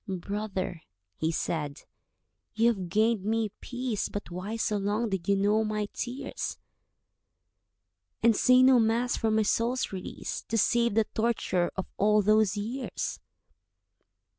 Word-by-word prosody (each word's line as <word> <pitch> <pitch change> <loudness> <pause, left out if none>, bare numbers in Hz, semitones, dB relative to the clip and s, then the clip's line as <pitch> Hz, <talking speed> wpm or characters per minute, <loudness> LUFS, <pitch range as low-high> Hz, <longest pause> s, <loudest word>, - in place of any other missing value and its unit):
"Brother," 190 -2 -3 0.3
he 160 +1 -1
said, 150 -3 -3 0.7
"you 225 +2 +4
have 190 -6 -2
gained 215 +1 +2
me 220 0 0
peace, 245 -4 -3
But 205 -4 -6
why 185 +5 -4
so 220 -2 0
long 205 +3 -1
did 190 -4 -3
you 200 - +5
know 205 +3 +2
my 210 -1 -2
tears, 250 +3 -4 1.7
And 230 -1 +5
say 255 +4 +5
no 260 -1 +7
Mass 230 +2 +2
for 225 - 0
my 220 0 +3
soul's 235 +4 0
release, 185 -1 -5
To 225 - -1
save 235 0 +2
the 225 -1 +4
torture 220 -6 0
of 190 - -3
all 210 +1 +4
those 215 -1 +3
years?" 240 +6 -4
215 Hz, 140 wpm, -28 LUFS, 195-230 Hz, 1.7 s, no